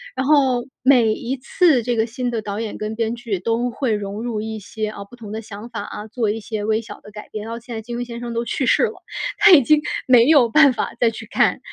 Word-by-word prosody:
然 265 Hz, -, -1 dB
后， 265 Hz, -4 st, +3 dB, 0.2 s
每 245 Hz, -4 st, +4 dB
一 245 Hz, +4 st, -3 dB
次 270 Hz, -, +2 dB
这 240 Hz, -1 st, -1 dB
个 220 Hz, -, +2 dB
新 245 Hz, +2 st, -4 dB
的 230 Hz, -2 st, -2 dB
导 205 Hz, +1 st, -4 dB
演 220 Hz, -, -5 dB
跟 215 Hz, +1 st, -4 dB
编 230 Hz, 0 st, -1 dB
剧 235 Hz, -5 st, -3 dB
都 230 Hz, +5 st, -1 dB
会 245 Hz, 0 st, -2 dB
融 205 Hz, +1 st, -4 dB
入 235 Hz, -3 st, -3 dB
一 220 Hz, +1 st, -4 dB
些 215 Hz, +1 st, -5 dB
啊， 210 Hz, -1 st, -7 dB
不 245 Hz, +5 st, -16 dB
同 220 Hz, -3 st, -10 dB
的 220 Hz, -, -4 dB
想 215 Hz, +1 st, -10 dB
法 230 Hz, -4 st, -5 dB
啊， 210 Hz, +1 st, -7 dB
做 220 Hz, 0 st, -1 dB
一 215 Hz, +2 st, -2 dB
些 215 Hz, -1 st, -5 dB
微 215 Hz, +1 st, +1 dB
小 230 Hz, -, -11 dB
的 210 Hz, -, -14 dB
改 210 Hz, 0 st, -10 dB
变。 215 Hz, -, -6 dB
然 225 Hz, -, -7 dB
后 230 Hz, -, -6 dB
现 235 Hz, 0 st, -9 dB
在 220 Hz, -, -4 dB
金 235 Hz, +2 st, -6 dB
庸 245 Hz, -, -3 dB
先 235 Hz, 0 st, -7 dB
生 235 Hz, -1 st, -5 dB
都 235 Hz, +1 st, -2 dB
去 265 Hz, +3 st, -1 dB
世 -, -, +3 dB
了， -, -, 0 dB, 0.4 s
他 415 Hz, -1 st, +6 dB
已 315 Hz, -6 st, +9 dB
经 300 Hz, +4 st, +3 dB, 0.3 s
没 245 Hz, -2 st, +6 dB
有 285 Hz, -6 st, +6 dB
办 280 Hz, +2 st, +6 dB
法 245 Hz, -, -4 dB
再 230 Hz, -2 st, +4 dB
去 225 Hz, 0 st, -9 dB
看 -, -, +2 dB
230 Hz, 290 characters per minute, -21 LUFS, 215-245 Hz, 0.4 s, 已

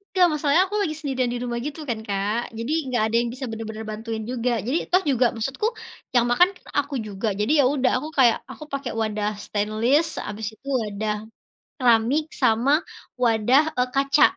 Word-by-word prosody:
Enggak, 365 Hz, -1 st, +6 dB
masalahnya 300 Hz, +2 st, +3 dB
aku 415 Hz, +2 st, -3 dB
lagi 310 Hz, -6 st, -1 dB
sendirian 265 Hz, -5 st, -1 dB
di -, -, -2 dB
rumah 240 Hz, -1 st, -2 dB
gitu 295 Hz, +5 st, -5 dB
kan, 230 Hz, -2 st, -1 dB
Kak. 205 Hz, +4 st, -1 dB
Jadi 230 Hz, +5 st, -3 dB, 0.2 s
enggak 245 Hz, -4 st, +1 dB
ada -, -, 0 dB
yang 235 Hz, 0 st, 0 dB
bisa 260 Hz, +1 st, -5 dB
benar-benar 220 Hz, 0 st, -6 dB
bantuin 220 Hz, +1 st, -5 dB
juga. 245 Hz, +1 st, -1 dB
Jadi 265 Hz, +7 st, +1 dB
toh 365 Hz, +2 st, +4 dB
juga 255 Hz, -1 st, +3 dB
maksudku 270 Hz, -, -1 dB, 0.5 s
yang 240 Hz, -1 st, +5 dB
makan 355 Hz, +9 st, +5 dB
kan -, -, -19 dB
aku 285 Hz, 0 st, -3 dB
juga. 200 Hz, +2 st, -3 dB
Jadi 210 Hz, +6 st, +1 dB
ya -, -, +6 dB
udah, 265 Hz, -3 st, +2 dB
aku 310 Hz, -, -5 dB
kayak 240 Hz, -4 st, +5 dB
aku -, -, -9 dB
pakai 275 Hz, -2 st, -3 dB
wadah 210 Hz, -1 st, -1 dB, 0.2 s
stainless, 220 Hz, +9 st, +1 dB, 0.2 s
habis 210 Hz, +1 st, -4 dB
itu 275 Hz, -, -20 dB
wadah 210 Hz, 0 st, -2 dB, 0.7 s
keramik 250 Hz, +6 st, +3 dB
sama 240 Hz, +2 st, +3 dB, 0.5 s
wadah, 235 Hz, +4 st, +4 dB, 0.2 s
eee, 250 Hz, -, +2 dB
kaca. 275 Hz, +1 st, +4 dB
245 Hz, 185 wpm, -24 LUFS, 220-280 Hz, 0.7 s, Enggak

